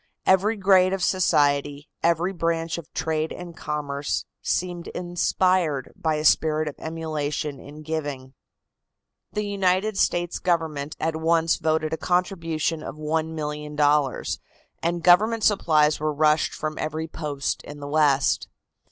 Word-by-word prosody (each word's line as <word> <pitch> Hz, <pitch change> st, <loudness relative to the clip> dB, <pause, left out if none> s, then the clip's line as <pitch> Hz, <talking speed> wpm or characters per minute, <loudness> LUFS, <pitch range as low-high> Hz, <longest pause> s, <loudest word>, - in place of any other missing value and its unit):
Every 200 Hz, +4 st, +3 dB
grade 190 Hz, -1 st, +4 dB
of 195 Hz, -2 st, -1 dB
society, 145 Hz, -5 st, +2 dB
every 170 Hz, +3 st, +1 dB
branch 165 Hz, -1 st, -1 dB
of 165 Hz, -, -13 dB
trade 160 Hz, +1 st, -1 dB
and 175 Hz, -2 st, -8 dB
commerce 140 Hz, -12 st, -3 dB, 0.2 s
seemed 175 Hz, -1 st, -2 dB
inspired 175 Hz, -4 st, 0 dB
by 160 Hz, -1 st, 0 dB
a 150 Hz, 0 st, -2 dB
spirit 155 Hz, 0 st, +3 dB
of 150 Hz, -, -3 dB
emulation 155 Hz, -3 st, -3 dB
in 150 Hz, +3 st, -11 dB
giving. 145 Hz, -4 st, -4 dB, 1.0 s
The 210 Hz, 0 st, -1 dB
United 195 Hz, +1 st, +1 dB
States 175 Hz, 0 st, +1 dB
Government 160 Hz, -5 st, -1 dB
at 160 Hz, 0 st, -1 dB
once 165 Hz, 0 st, +2 dB
voted 155 Hz, 0 st, 0 dB
a -, -, -1 dB
contribution 165 Hz, -3 st, -1 dB
of 135 Hz, -, -7 dB
$1,000,000, 150 Hz, -2 st, 0 dB, 0.4 s
and 170 Hz, 0 st, -1 dB
government 215 Hz, +5 st, +5 dB
supplies 155 Hz, -7 st, +3 dB
were 155 Hz, 0 st, 0 dB
rushed 155 Hz, +1 st, +2 dB
from 155 Hz, 0 st, -4 dB
every 155 Hz, +1 st, -3 dB
post 150 Hz, -3 st, -3 dB
in 145 Hz, 0 st, -10 dB
the 145 Hz, -, -6 dB
West. 145 Hz, -2 st, +2 dB
160 Hz, 130 wpm, -24 LUFS, 150-175 Hz, 1.0 s, government